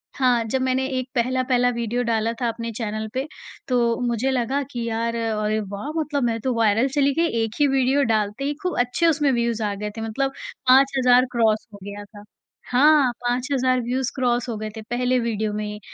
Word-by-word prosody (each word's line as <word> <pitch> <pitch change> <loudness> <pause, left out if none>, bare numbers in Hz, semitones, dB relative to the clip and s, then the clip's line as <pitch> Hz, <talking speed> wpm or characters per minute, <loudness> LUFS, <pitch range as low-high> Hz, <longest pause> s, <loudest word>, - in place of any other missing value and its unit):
हाँ, 250 -3 +2
जब 240 +4 -2
मैंने 260 0 +1
एक 255 - -5
पहला-पहला 250 0 +2
वीडियो 235 +1 -2
डाला 225 -1 0
था 240 - +1
अपने 230 0 -4
चैनल 215 -1 -3
पे, 265 +3 -2 0.4
तो 235 -2 +1
मुझे 240 +3 0
लगा 260 +2 0
कि 240 -3 -4
यार, 230 +1 -1
अरे 215 -2 -1
वाह, 205 +6 -6
मतलब 295 -3 -1
मैं 230 -1 0
तो 260 +2 0
वायरल 225 +2 +2
चली 280 -1 +3
गई, 335 - +3 0.2
1 225 0 -4
ही 290 - +5
वीडियो 270 +1 +2
डालते 210 +4 -1
ही, 285 +1 0
खूब 360 - -2
अच्छे 250 +7 +1
उसमें 295 -3 +2
व्यूज़ 235 -2 0
आ 205 -1 -1
गए 210 +1 -4
थे, - - -4
मतलब 270 +5 -1 0.4
5000 270 +2 +6
हज़ार 250 -1 +5
क्रॉस 225 -2 +1
हो - - -9
गया 205 +1 -7
था। 205 0 -14 0.5
हाँ, 280 +1 +5
5000 255 +1 +1
व्यूज़ 245 +1 -2
क्रॉस 245 -1 0
हो 225 - -3
गए 215 0 -4
थे - - -5
पहले 250 +1 +1
वीडियो 220 -3 -2
में 210 0 -3
ही, 210 0 -6
245 Hz, 205 wpm, -23 LUFS, 225-260 Hz, 0.5 s, 5000